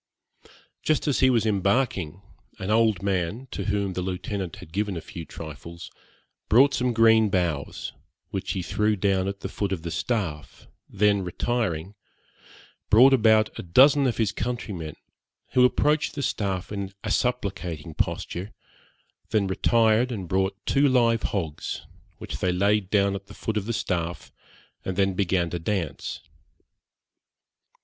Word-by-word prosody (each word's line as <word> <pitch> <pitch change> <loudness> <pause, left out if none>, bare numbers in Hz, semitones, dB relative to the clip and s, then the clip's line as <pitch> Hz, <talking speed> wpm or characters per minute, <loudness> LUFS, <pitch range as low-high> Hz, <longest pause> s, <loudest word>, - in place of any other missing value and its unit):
Just 155 -1 +1
as 145 - +2
he 130 - +5
was 115 -4 +2
embarking, 100 - 0 0.3
an 95 +2 -3
old 110 -4 +3
man, 100 +6 -1
to 100 - -4
whom 100 -2 0
the 90 - -3
Lieutenant 95 0 -4
had 80 - -13
given 100 -1 -1
a - - -2
few 85 -2 -8
trifles, 80 +2 -9 0.6
brought 135 +5 +6
some 125 0 +1
green 110 -1 +5
boughs, 85 -7 -2 0.4
which 95 - -3
he 95 - -3
threw 105 +4 +1
down 95 -1 +1
at 100 0 -5
the - - -3
foot 100 -2 -3
of 90 -4 -3
the 85 - -4
staff, 85 -12 -3 0.2
then 100 0 +2
retiring, 90 -2 -2 1.0
brought 130 +5 +7
about 110 -3 +4
a - - -2
dozen 135 - +5
of 120 - -1
his 110 -4 +1
countrymen, 100 -9 -4 0.6
who 125 -1 +5
approached 150 +4 +2
the 140 - -3
staff 95 -5 -2
in 100 -2 -4
a 110 - -2
supplicating 90 -11 -2
posture, 90 +6 -3 0.8
then 110 -2 +2
retired 115 +5 +3
and 100 -6 -4
brought 95 +2 0
two 140 +1 +3
live 115 -3 +3
hogs, 80 -7 -4 0.3
which - - -7
they 90 - +1
laid 100 +1 +1
down 100 -1 +3
at 100 0 -6
the - - -12
foot 110 - -3
of 105 -2 -1
the - - -1
staff, 85 -6 -3 0.5
and 95 -1 -4
then 95 -1 +2
began 90 -3 0
to 85 - -3
dance. 85 -5 -3
100 Hz, 150 wpm, -25 LUFS, 90-115 Hz, 1.0 s, brought